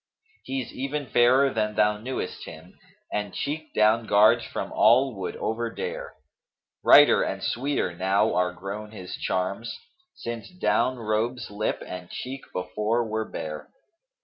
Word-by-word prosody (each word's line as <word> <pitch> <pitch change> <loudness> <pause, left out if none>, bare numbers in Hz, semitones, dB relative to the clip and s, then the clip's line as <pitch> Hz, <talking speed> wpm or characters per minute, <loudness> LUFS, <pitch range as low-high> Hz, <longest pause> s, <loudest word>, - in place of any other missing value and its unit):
He's 130 -2 -4
even 140 +2 -3
fairer 130 +3 +4
than 105 -1 -1
thou 105 0 +3
knewest 130 +4 -5
him, 80 +3 -11 0.2
* - - -19
And 105 -2 -2
cheek 155 +2 -3
down 110 +1 +3
guards 105 +1 +5
from - - -5
all 125 +4 +5
would 95 - -4
overdare. 115 +1 -4 0.7
Brighter - - +7
and - - -2
sweeter 130 -8 -1
now 95 +4 +2
are 90 0 +1
grown 100 +4 -7
his 90 -4 -7
charms, 95 +5 -2 0.2
* 360 0 -40
Since 115 -1 -5
down 155 -8 +1
robes 115 +1 -2
lip 105 +1 -2
and 90 -1 -8
cheek 130 +1 -6
before 105 +5 -1
were 110 0 -2
bare. 75 -1 -6
110 Hz, 145 wpm, -26 LUFS, 100-130 Hz, 0.7 s, Brighter